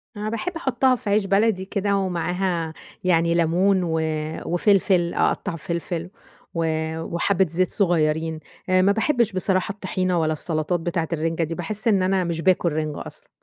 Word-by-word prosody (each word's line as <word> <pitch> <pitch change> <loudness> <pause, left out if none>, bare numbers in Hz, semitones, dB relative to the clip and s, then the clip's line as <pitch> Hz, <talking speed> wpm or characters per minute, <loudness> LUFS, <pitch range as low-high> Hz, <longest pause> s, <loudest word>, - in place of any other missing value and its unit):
أنا 210 +1 -3
باحب 230 +11 -3
أحطها 265 -4 +2
في 240 -3 -5
عيش 205 0 +2
بلدي 195 0 +2
كده 200 0 0
ومعاها 180 -2 -1 0.3
يعني 170 -2 +3
ليمون 180 +3 +2
و 160 -2 0 0.5
وفلفل، 180 -1 +2
أقطّع - - 0
فلفل 170 +1 -4 0.4
و 165 -1 0 0.4
وحبة 190 +3 +1
زيت 180 +3 0
صغيرين. 160 -4 +1 0.3
آآ، 185 0 +4
ما 195 - +4
بحبش 230 0 +1
بصراحة 185 +1 0
الطحينة 185 -3 -1
ولا 155 -1 +1
السلطات 155 +2 -1
بتاعة 165 0 -2
الرنجة 165 +1 -1
دي، 165 +1 -3
باحس 210 +6 -3
إن 195 -4 +3
أنا 190 0 +2
مش 170 -1 -2
باكل 180 -1 +2
رنجة 155 -1 -3
أصلًا. - - -14
180 Hz, 155 wpm, -23 LUFS, 165-200 Hz, 0.5 s, آآ